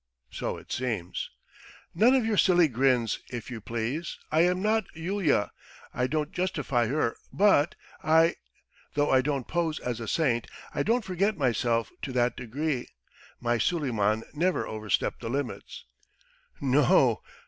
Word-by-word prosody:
"So - - -3
it - - -13
seems!" 115 -9 -3 0.6
"None 230 +9 +5
of 255 -4 +2
your 220 -1 +1
silly 175 -4 +5
grins, 125 -3 +1
if 120 0 -6
you 115 -3 -6
please! 120 +10 -3
I 155 - +4
am 180 +1 +3
not 215 +1 +1
a - - -10
Yulia.... 170 - +1 0.4
I 125 - 0
don't 150 +1 -1
justify 150 -10 0
her 130 -2 0
but 190 -6 +4 0.3
I...! 160 +1 +4 0.6
Though 145 0 +2
I 130 - +5
don't 140 -2 -2
pose 165 -3 -1
as 120 -2 -3
a 115 - -5
saint, 120 -4 +1 0.3
I - - 0
don't 230 +1 +1
forget 195 +2 0
myself 120 -4 +1
to 135 - -4
that 120 -1 +2
degree. 135 +2 -3 0.5
My 120 -1 0
Suleiman 110 - +1
never 175 +4 +1
overstepped 110 -1 -2
the 115 - -4
limits.... 135 +1 -4 0.7
No 140 +1 +3
o! - - +4
140 Hz, 150 wpm, -28 LUFS, 120-170 Hz, 0.7 s, None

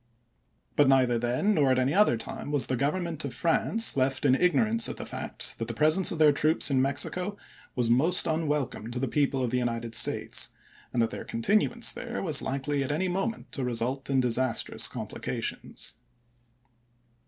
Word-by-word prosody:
But 145 - +4
neither 130 -3 +3
then 125 - +1
nor 150 -7 +2
at 130 - +3
i86*?eMs. - - +2
any 130 +3 0
other 200 - +4
time 115 - -6
was 145 -3 +2
the 130 - -2
Government 155 +4 -2
of 135 -4 -6
France 215 - +1
left 135 +1 0
in 130 - +5
ignorance 220 - +2
of - - -5
the - - -7
fact - - -5
that 115 - -3
the 115 - -5
presence 155 +7 +3
of 170 - -3
their 155 -1 +6
troops 155 +1 +2
in 130 -1 +3
Mexico 180 +9 -2 0.4
was 120 -2 +1
most 160 +9 +6
unwelcome 150 -8 -2
to 120 - -6
the 135 +2 -1
people 135 0 0
of 120 - -2
the 125 - +1
United 115 -1 -3
States, - - 0 0.4
and 120 - +1
that 115 - -2
their - - -6
continuance 215 - +1
there 235 +1 -6
was 155 -7 +3
likely 140 +1 -2
at 135 - -3
any 185 +5 -1
moment 195 +5 -3
to 135 - -4
result 125 +3 -2
in 135 -1 +2
disastrous 125 0 +1
complications. - - -5
140 Hz, 185 wpm, -27 LUFS, 125-165 Hz, 0.4 s, their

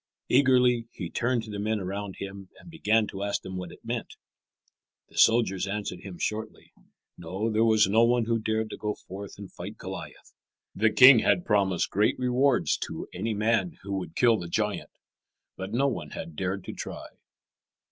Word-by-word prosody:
Eagerly 125 -3 +4
he 85 -4 -6
turned 120 -1 0
to 110 - -9
the 100 - -5
men 110 +1 0
around 100 +1 -5
him 95 -1 -8
and 170 - -14
began 110 -9 +2
to 100 -1 -7
ask 100 0 -2
them 95 0 -7
what 90 -2 -5
it - - -16
meant. - - -4 0.9
The - - -16
soldiers 110 -5 +4
answered 100 -2 -4
him 95 -1 -9
shortly. 110 +3 -4 0.5
No, 95 +7 -3
there 110 +1 +2
was 110 -3 +4
no 110 +4 +4
one 120 0 +3
who 115 0 +1
dared 110 0 -1
to - - -6
go 105 -1 -3
forth 100 +2 -9
and 100 -2 -10
fight - - -8
Goliath. - - -9 0.4
The 110 +1 +3
king 125 +1 +9
had 175 - +2
promised 100 -5 +1
great 105 +2 +2
rewards 125 +1 +2
to - - -6
any 110 -1 -2
man 115 - +1
who 100 0 -5
would 85 -3 -8
kill 115 -3 +4
the 85 - -6
giant. 105 +4 -2 0.7
But 95 +1 -6
no 135 +5 +2
one 85 - -3
had 80 - -8
dared 95 +3 -2
to - - -7
try. - - -7
105 Hz, 185 wpm, -27 LUFS, 95-115 Hz, 0.9 s, king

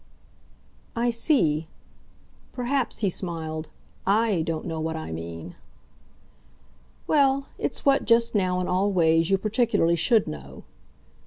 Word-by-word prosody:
"I 235 +1 +1
see. 165 - +2 0.9
Perhaps," 250 -1 -1
he 200 - +2
smiled, 160 -3 -4 0.3
"I 205 -2 +2
don't 160 -1 -3
know 160 -1 -4
what 160 0 -2
I 160 - -6
mean." 85 +1 -7 1.5
"Well, 275 -2 +3
it's - - -3
what, 275 -1 +3
just 230 0 +3
now, 185 -3 +1
in 180 - -2
all 195 +3 +1
ways, 165 -2 +3
you 195 - +4
particularly 215 -5 +1
should 215 +7 +3
know." 70 -2 -9
180 Hz, 120 wpm, -25 LUFS, 160-230 Hz, 1.5 s, you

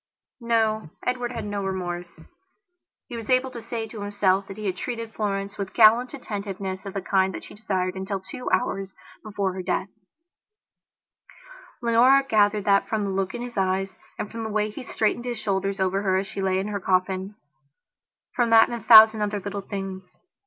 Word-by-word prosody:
No, 220 -5 0 0.2
Edward 250 -1 -1
had 230 -3 -5
no 205 -1 -3
remorse. 175 -3 -5 0.9
He 245 - -7
was 225 -2 -7
able 255 0 +2
to 235 - -7
say 230 0 -4
to 220 -1 -9
himself 200 -1 +1
that 195 - -9
he 215 - -6
had 190 -2 -1
treated 230 +2 -5
Florence 200 -1 -3
with 195 -1 -5
gallant 235 +4 +5
attentiveness 200 -5 -5
of 195 - -8
the 195 - -3
kind 190 0 +1
that - - -7
she - - -12
desired 185 -3 -2
until 190 +1 -4
two 190 +6 -7
hours 195 -5 -1 0.3
before 200 -3 -2
her 185 - -5
death. 185 +1 -2 1.9
Leonora 245 +4 +5
gathered 210 -2 +2
that 200 -1 +3
from 220 -2 0
the 200 - -2
look 190 +3 -2
in 240 - -4
his 245 -3 -8
eyes, 190 0 0 0.2
and 210 - -5
from 230 - -6
the 220 - -4
way 215 0 0
he - - -8
straightened 235 0 -1
his 240 -1 -3
shoulders 195 -1 -2
over 190 +1 +1
her 190 -2 +1
as 195 - -1
she 195 - -6
lay 190 -1 +1
in 195 +2 -2
her 205 -1 -3
coffinfrom 190 +2 0 1.1
that 225 -1 +6
and - - -6
a 235 - -5
thousand 220 -1 +9
other 210 0 -1
little 200 +1 -5
things. 190 -2 -7
205 Hz, 190 wpm, -25 LUFS, 190-225 Hz, 1.9 s, thousand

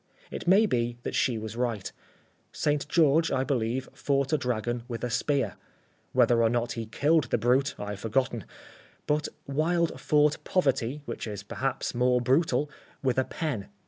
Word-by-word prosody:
It - - -6
may 195 +5 +6
be 120 - 0
that - - -4
she 120 -3 +1
was 110 0 -6
right. 115 -5 -2 0.6
St. 150 -1 0
George, 160 0 +4
I 130 -1 +1
believe, 130 -1 -1
fought 140 0 0
a - - +5
dragon 120 -1 -1
with 115 -3 -5
a 125 - -1
spear. 140 +3 0 0.5
Whether 120 -1 +4
or 115 - +4
not 120 0 0
he 115 -2 -4
killed 150 +6 +2
the - - 0
brute 130 +4 +2
I 105 0 -5
have 100 - -6
forgotten. 115 0 -1 0.6
But 150 0 +1 0.2
Wilde 165 +4 0
fought 150 0 +2
poverty, 140 -5 0
which 115 - -5
is 100 -2 -6
perhaps 130 +6 -2
more 125 0 +3
brutal, 145 +5 +2 0.4
with 130 -1 +2
a 130 - +1
pen. 135 -12 -3
130 Hz, 170 wpm, -28 LUFS, 115-150 Hz, 0.6 s, may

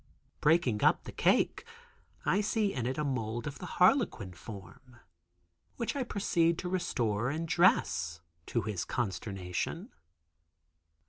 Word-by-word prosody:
Breaking 150 -9 +3
up - - +4
the - - -8
cake, - - +2 0.6
I 200 - +3
see 210 -1 0
in 120 -2 -2
it 130 - -2
a 150 - 0
mould 120 -4 -2
of 145 -1 -6
the 180 - -6
harlequin 180 - +3
form, 105 +6 -11 0.8
which 235 +4 -2
I 280 - -1
proceed 170 -8 +1
to 180 - -4
restore 120 - 0
and 160 +4 -3
dress, 85 - +2 0.3
to 115 - 0
his 100 -4 -2
consternation. 95 -5 -3
130 Hz, 130 wpm, -31 LUFS, 105-175 Hz, 0.8 s, up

